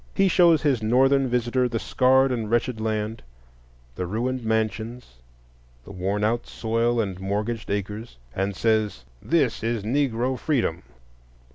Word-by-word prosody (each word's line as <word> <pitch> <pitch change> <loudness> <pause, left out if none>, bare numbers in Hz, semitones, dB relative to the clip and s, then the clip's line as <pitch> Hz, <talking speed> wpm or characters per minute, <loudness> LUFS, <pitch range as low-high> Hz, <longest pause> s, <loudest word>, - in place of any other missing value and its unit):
He 195 -1 +4
shows 170 -4 +4
his 135 -6 +2
Northern 135 +4 +3
visitor 125 +1 +1
the 115 - -2
scarred 130 +3 +3
and 115 -4 -2
wretched 120 0 0
land; 110 0 -2 0.7
the 90 +7 -4
ruined 120 +6 -2
mansions, 110 - -2 0.7
the 100 - -12
worn 100 +2 -2
out 115 +2 0
soil 115 +1 0
and 95 -4 -2
mortgaged 105 +4 -3
acres, 105 - -4 0.2
and 95 +1 -1
says, 110 - 0 0.2
This 145 -8 +1
is 115 -1 -1
Negro 125 +1 0
freedom! 120 - 0
115 Hz, 135 wpm, -24 LUFS, 105-125 Hz, 0.7 s, He